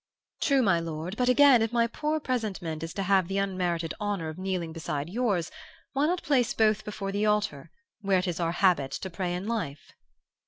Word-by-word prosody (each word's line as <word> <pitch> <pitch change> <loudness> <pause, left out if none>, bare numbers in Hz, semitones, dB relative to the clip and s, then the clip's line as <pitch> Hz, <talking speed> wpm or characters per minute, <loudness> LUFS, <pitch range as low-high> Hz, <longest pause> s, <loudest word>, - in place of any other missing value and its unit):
"'True, 275 -4 +3
my 190 -6 +3
lord 165 +3 -5
but, 250 +2 +1
again, 260 -1 +6
if 225 0 0
my 235 -1 +3
poor 300 +6 -2
presentment 200 - -3
is 165 0 -5
to 195 - -3
have 190 -2 +3
the 195 +1 -2
unmerited 180 -4 -1
honor 205 -6 -2
of 155 - -8
kneeling 185 -4 -2
beside 155 -1 -4
yours, 205 -7 0 0.4
why 280 +2 +2
not 355 +2 -1
place 255 -5 +2
both 215 -1 +3
before 205 -2 -4
the 205 +2 0
altar, 210 -8 0 0.3
where 195 -2 +2
it 185 +1 -1
is 175 -1 -2
our 170 -1 0
habit 175 -8 +3
to 190 - -5
pray 180 0 -2
in 180 +2 -4
life? 165 -12 -4
195 Hz, 200 wpm, -28 LUFS, 170-225 Hz, 0.4 s, again